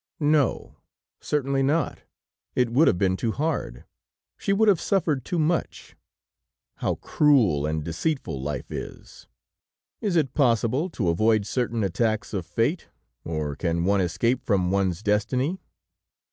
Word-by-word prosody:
No, 150 Hz, -3 st, +1 dB, 0.4 s
certainly 140 Hz, -2 st, 0 dB
not; 145 Hz, +3 st, 0 dB, 0.6 s
it 125 Hz, -2 st, +1 dB
would 145 Hz, +7 st, +4 dB
have -, -, +3 dB
been 95 Hz, 0 st, +2 dB
too 110 Hz, +4 st, -1 dB
hard; 140 Hz, -, -3 dB, 0.5 s
she -, -, -2 dB
would 215 Hz, +2 st, +3 dB
have 195 Hz, -5 st, +4 dB
suffered 160 Hz, -, 0 dB
too 175 Hz, -, -3 dB
much! 165 Hz, +1 st, -1 dB, 0.8 s
How -, -, -1 dB
cruel 110 Hz, -, +2 dB
and 80 Hz, 0 st, -2 dB
deceitful 85 Hz, -, -2 dB
life 70 Hz, -2 st, -5 dB
is! -, -, -8 dB, 0.7 s
Is 200 Hz, -4 st, -1 dB
it 150 Hz, -6 st, +1 dB
possible 130 Hz, +4 st, +2 dB
to 105 Hz, -, -1 dB
avoid 110 Hz, +4 st, +2 dB
certain 115 Hz, -1 st, -1 dB
attacks 110 Hz, +4 st, -1 dB
of 90 Hz, -4 st, -3 dB
fate, 120 Hz, -, -1 dB, 0.4 s
or 75 Hz, -3 st, -3 dB
can 85 Hz, +2 st, -1 dB
one 100 Hz, 0 st, +3 dB
escape 115 Hz, +8 st, 0 dB
from 95 Hz, -4 st, +1 dB
one's 95 Hz, -1 st, 0 dB
destiny? 125 Hz, -, 0 dB
115 Hz, 135 wpm, -25 LUFS, 90-150 Hz, 0.8 s, would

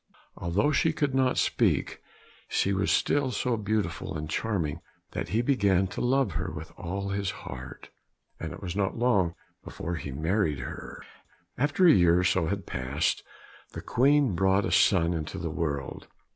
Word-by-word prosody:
Although 95 Hz, -, +1 dB
she 160 Hz, +2 st, +2 dB
could 145 Hz, -3 st, 0 dB
not 130 Hz, -1 st, +2 dB
speak, -, -, +1 dB, 0.5 s
she 100 Hz, -, +1 dB
was 95 Hz, +1 st, 0 dB
still 145 Hz, -2 st, +2 dB
so 125 Hz, +1 st, 0 dB
beautiful 105 Hz, -7 st, -2 dB
and 75 Hz, 0 st, -5 dB
charming 85 Hz, -4 st, -2 dB, 0.3 s
that -, -, -4 dB
he 110 Hz, +6 st, +1 dB
began 100 Hz, -8 st, +3 dB
to 100 Hz, -, -5 dB
love 130 Hz, -3 st, +2 dB
her 90 Hz, +3 st, -3 dB
with 80 Hz, -2 st, -8 dB
all 100 Hz, +3 st, -4 dB
his 100 Hz, -1 st, -1 dB, 0.2 s
heart, 65 Hz, 0 st, -9 dB, 0.5 s
and -, -, -5 dB
it -, -, -9 dB
was 90 Hz, -1 st, -4 dB
not 100 Hz, +1 st, -1 dB
long 100 Hz, -8 st, +2 dB, 0.3 s
before 85 Hz, 0 st, -5 dB
he 70 Hz, -, -6 dB
married 80 Hz, +2 st, 0 dB
her. 60 Hz, -, -8 dB, 0.5 s
After 145 Hz, +7 st, +2 dB
a 170 Hz, -, +9 dB
year 85 Hz, -4 st, +5 dB
or 90 Hz, -, +2 dB
so 90 Hz, -2 st, +2 dB
had 100 Hz, -1 st, -3 dB
passed, 65 Hz, +3 st, -1 dB, 0.5 s
the -, -, -6 dB
Queen 140 Hz, -2 st, +3 dB
brought 95 Hz, +3 st, +2 dB
a -, -, -2 dB
son 90 Hz, -4 st, +4 dB
into 80 Hz, -2 st, -4 dB
the 85 Hz, -2 st, -3 dB
world. 75 Hz, -5 st, -3 dB
95 Hz, 170 wpm, -28 LUFS, 85-120 Hz, 0.5 s, a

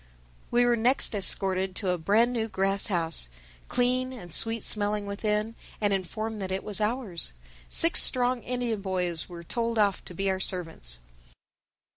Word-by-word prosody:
We 245 Hz, 0 st, +3 dB
were 240 Hz, 0 st, +3 dB
next 240 Hz, +2 st, +3 dB
escorted 190 Hz, -1 st, 0 dB
to 195 Hz, -, -2 dB
a 180 Hz, -, -1 dB
brand 220 Hz, +8 st, +2 dB
new 225 Hz, -2 st, -1 dB
grass 195 Hz, -1 st, +2 dB
house, 165 Hz, -, +1 dB, 0.4 s
clean 250 Hz, +1 st, 0 dB
and 180 Hz, -10 st, -9 dB
sweet 225 Hz, -1 st, +2 dB
smelling 210 Hz, 0 st, +1 dB
within, 210 Hz, +2 st, -2 dB, 0.3 s
and 205 Hz, -2 st, +1 dB
informed 215 Hz, +3 st, -4 dB
that 190 Hz, -1 st, -4 dB
it 190 Hz, -, -3 dB
was 210 Hz, 0 st, -2 dB
ours. 210 Hz, -, -2 dB, 0.4 s
Six 330 Hz, +1 st, +5 dB
strong 250 Hz, -1 st, +4 dB
Indian 245 Hz, -4 st, -2 dB
boys 180 Hz, -4 st, 0 dB
were 170 Hz, -1 st, -9 dB
told 230 Hz, +5 st, -2 dB
off 205 Hz, -3 st, +2 dB
to 180 Hz, -, -10 dB
be 195 Hz, +3 st, -2 dB
our 190 Hz, -1 st, 0 dB
servants. 165 Hz, -, -2 dB
205 Hz, 160 wpm, -27 LUFS, 185-230 Hz, 0.4 s, Six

